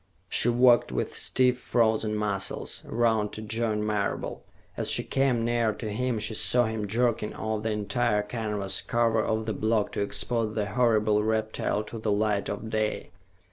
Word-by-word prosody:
She 120 - +2
walked, 120 0 +4
with - - -3
stiff, 125 -1 +2
frozen 110 -3 +1
muscles, 100 -2 -1
around 110 -3 +1
to 110 - -5
join 110 -1 -1
Marable. 105 -1 -2 0.3
As - - -2
she - - +4
came 130 -4 +1
near 115 -2 +1
to 105 0 -6
him, 125 +2 -1
she 110 +1 -1
saw 120 +3 +2
him 110 -2 -3
jerking 115 0 0
off 110 -1 -3
the 110 - -2
entire 105 +1 0
canvas 105 -3 -2
cover 115 -1 +1
of 110 0 -1
the 110 - -2
block 110 +1 0
to - - -3
expose 105 +2 -1
the 105 -2 0
horrible 110 -3 +2
reptile 110 -1 -1
to 110 +1 -8
the 110 -1 -1
light 105 -1 0
of 105 +2 -5
day. 110 -1 -2
110 Hz, 170 wpm, -27 LUFS, 105-115 Hz, 0.3 s, walked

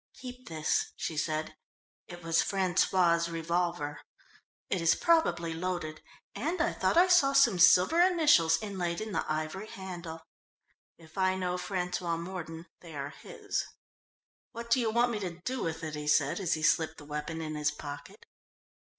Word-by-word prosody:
"Keep 250 -1 -10
this," 155 -1 -1
she 160 - -4
said. 155 0 -2 0.5
It 175 -1 -10
was 165 0 +2
François' 180 -3 +2
revolver. 165 -2 -2 0.7
"It 185 - -1
is 165 0 +4
probably 175 - +2
loaded 165 -2 -4 0.3
and 335 +4 -2
I 340 +1 +1
thought - - 0
I 360 +2 +7
saw 345 -7 +5
some 240 -9 +4
silver 185 - +6
initials 300 - +4
inlaid 180 -5 -3
in 215 0 -5
the - - -1
ivory 155 +7 -3
handle. 175 -5 -8 0.7
If 160 +2 -12
I 185 0 +2
know 180 -1 -2
François 180 -2 -2
Mordon, 170 -2 -7
they 165 -3 -11
are 140 0 -4
his." - - -4 0.9
"What 235 0 -8
do 255 - +5
you 230 -2 +1
want 240 +2 +2
me 215 - -2
to 175 -3 -5
do 255 +6 -3
with 165 0 -3
it?" 155 -1 -4
he 150 0 -5
said 145 +1 +2
as 185 -4 0
he 155 - -6
slipped 160 0 +2
the 145 - -12
weapon 150 +2 -5
in 155 -1 -4
his 150 0 0
pocket. 145 -1 -9
175 Hz, 165 wpm, -30 LUFS, 160-200 Hz, 0.9 s, I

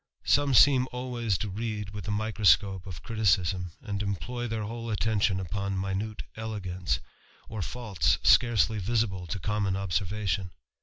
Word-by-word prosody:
Some 140 -2 +3
seem 130 +1 +6
always 120 -5 -1
to 105 - -3
read 105 0 -4
with 105 -3 -7
the 105 - -2
microscope 105 -2 +2
of 90 -5 -8
criticism, 95 -5 +1
md 100 -2 -3
employ 120 +5 -3
their 110 -1 -3
whole 115 +2 -5
attention 105 -3 +1
upon 100 +2 -3
minute 100 +3 -3
elegance, 95 -5 -3 0.5
yt 110 -4 -3
faults 110 -5 0
scarcely 110 -4 +4
visible 100 -3 -1
to 100 - -3
common 100 0 -1
observation. 95 0 -1
105 Hz, 140 wpm, -28 LUFS, 95-110 Hz, 0.5 s, seem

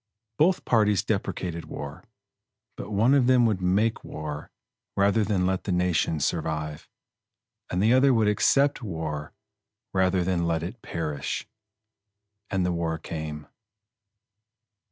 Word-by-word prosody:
Both 180 +4 +3
parties 105 -4 +3
deprecated 85 -2 -2
war; 70 +6 -7 0.7
but - - -7
one 110 +6 +3
of 135 -3 +4
them 125 -2 +5
would 105 -5 +1
make 100 +5 +1
war 75 -1 -6 0.5
rather 100 +2 +3
than 100 -3 +1
let 95 0 -1
the 100 - -1
nation 90 -3 +1
survive; 75 -1 -2 0.8
and 90 +2 0
the 110 +3 +5
other 135 +2 +5
would 110 -4 +3
accept 135 +7 +3
war 80 -7 -4 0.6
rather 95 -1 +2
than 85 -2 0
let 80 -1 0
it 105 +7 -6
perish. 75 -4 -4 1.0
And 95 -3 0
the 90 - +1
war 85 -1 -1
came. 75 -2 -6
90 Hz, 130 wpm, -26 LUFS, 80-110 Hz, 1.0 s, them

